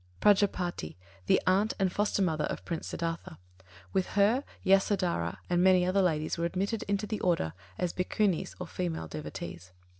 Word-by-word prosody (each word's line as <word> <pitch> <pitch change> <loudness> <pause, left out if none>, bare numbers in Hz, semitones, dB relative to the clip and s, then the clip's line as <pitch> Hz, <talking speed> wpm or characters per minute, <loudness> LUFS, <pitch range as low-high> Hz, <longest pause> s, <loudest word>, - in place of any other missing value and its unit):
Prajāpatī, 185 - +2 0.3
the - - +5
aunt 195 +4 +2
and 190 -3 +1
foster 205 -1 +1
mother 155 -4 +1
of - - -5
Prince 165 -2 -4
Siddhārtha. 165 - -4 0.6
With 190 -1 +1
her, 220 +7 +4 0.2
Yasodharā 190 - +2
and 175 0 +2
many 185 -1 +5
other 190 +2 +2
ladies 155 -3 0
were 170 - +1
admitted 195 +5 -1
into 200 +1 0
the 215 0 -3
Order 165 - +1 0.2
as 180 - -1
Bhikkhunis 190 0 0
or 180 - -4
female 170 - -3
devotees. 85 +3 -7
180 Hz, 155 wpm, -30 LUFS, 165-195 Hz, 0.6 s, the